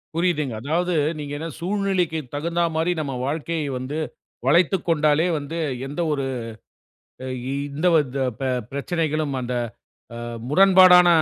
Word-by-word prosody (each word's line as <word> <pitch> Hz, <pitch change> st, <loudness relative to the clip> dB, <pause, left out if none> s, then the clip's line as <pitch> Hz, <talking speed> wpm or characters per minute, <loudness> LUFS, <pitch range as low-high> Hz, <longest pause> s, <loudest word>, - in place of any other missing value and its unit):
புரியுதுங்க. 165 Hz, -7 st, 0 dB
அதாவது, 170 Hz, +6 st, 0 dB, 0.3 s
நீங்க 145 Hz, -1 st, -5 dB
என்ன 160 Hz, -, -4 dB
சூழ்நிலைக்கு 185 Hz, -3 st, 0 dB, 0.2 s
தகுந்த 170 Hz, +4 st, -1 dB
மாரி, 165 Hz, +2 st, +1 dB
நம்ம 140 Hz, -3 st, -3 dB
வாழ்க்கையை 155 Hz, +1 st, -2 dB
வந்து, 135 Hz, +5 st, -4 dB, 0.5 s
வளைத்துக் 175 Hz, +5 st, +3 dB
கொண்டாலே 155 Hz, +1 st, +3 dB
வந்து, 150 Hz, +4 st, -5 dB, 0.3 s
எந்த 150 Hz, +5 st, -3 dB
1 140 Hz, -2 st, -2 dB, 1.3 s
இ -, -, -2 dB, 0.2 s
இந்த 160 Hz, +5 st, 0 dB
வந்த 140 Hz, -4 st, +1 dB
அ -, -, -11 dB
பெ 135 Hz, -, 0 dB, 0.2 s
பிரச்சனைகளும், 155 Hz, 0 st, -1 dB
அந்த, 125 Hz, 0 st, -3 dB, 0.6 s
அ -, -, -6 dB, 0.3 s
முரண்பாடான 185 Hz, +1 st, +7 dB
160 Hz, 130 wpm, -23 LUFS, 145-175 Hz, 1.3 s, முரண்பாடான